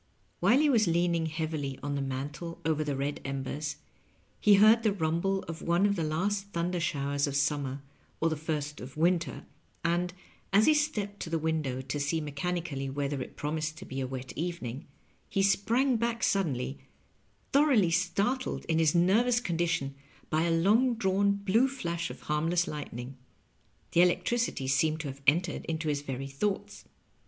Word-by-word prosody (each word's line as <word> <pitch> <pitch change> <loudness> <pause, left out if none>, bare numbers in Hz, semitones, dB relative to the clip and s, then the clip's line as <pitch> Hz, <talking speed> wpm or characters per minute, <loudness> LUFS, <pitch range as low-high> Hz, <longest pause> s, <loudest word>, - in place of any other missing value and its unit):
While 245 - +5
he 305 - +4
was 230 -8 +4
leaning 170 -1 +2
heavily 155 -4 -3
on 145 0 -2
the 140 - -1
mantel 140 +5 -5
over 155 -1 +1
the 145 -2 -2
red 140 +2 -2
embers, 140 +2 -3 0.6
he 205 -1 +6
heard 215 +3 +7
the 220 -2 +2
rumble 190 +2 0
of 165 0 -7
one 170 +3 +2
of 200 0 +2
the 170 - -1
last 195 +6 -1
thunder 175 +1 -1
showers 140 -2 0
of 140 - -3
summer 140 -1 0 0.4
or 165 - +2
the 160 - 0
first 150 -1 -3
of 130 +3 -9
winter, 170 +1 +1 0.4
and, 175 +1 +1 0.4
as 205 +3 +5
he 310 - +6
stepped 215 -10 -1
to - - -5
the 165 - 0
window 155 -5 -1
to 140 +2 -4
see 145 +3 0
mechan 155 +4 -2
ically 135 -5 -4
whether 140 0 -2
it - - -7
promised 155 +1 -3
to - - -9
be 135 0 -4
a 130 - -2
wet 130 0 -6
evening, 150 -7 -4 0.4
he 195 - +1
sprang 235 +6 +2
back 230 0 -1
suddenly, 140 -9 0 0.7
thoroughly 265 - +4
startled 200 +9 0
in 160 0 +1
his 160 0 +3
nervous 225 +8 +4
condi 175 -6 -1
tion 140 -5 -1 0.4
by 155 0 +2
a 170 - +1
long 215 +9 +3
drawn 200 -2 +2
blue 200 +5 +2
flash 170 -11 -3
of - - -9
harmless 165 +4 +1
lightning. 135 -3 -6 0.7
The 170 - +5
electricity 180 - +1
seemed 155 +4 +2
to 145 - -4
have 135 +1 -9
entered 165 +4 +2
into 160 -1 -2
his 145 -1 0
very 135 -1 -4
thoughts. 165 +9 -3
165 Hz, 175 wpm, -29 LUFS, 145-195 Hz, 0.7 s, heard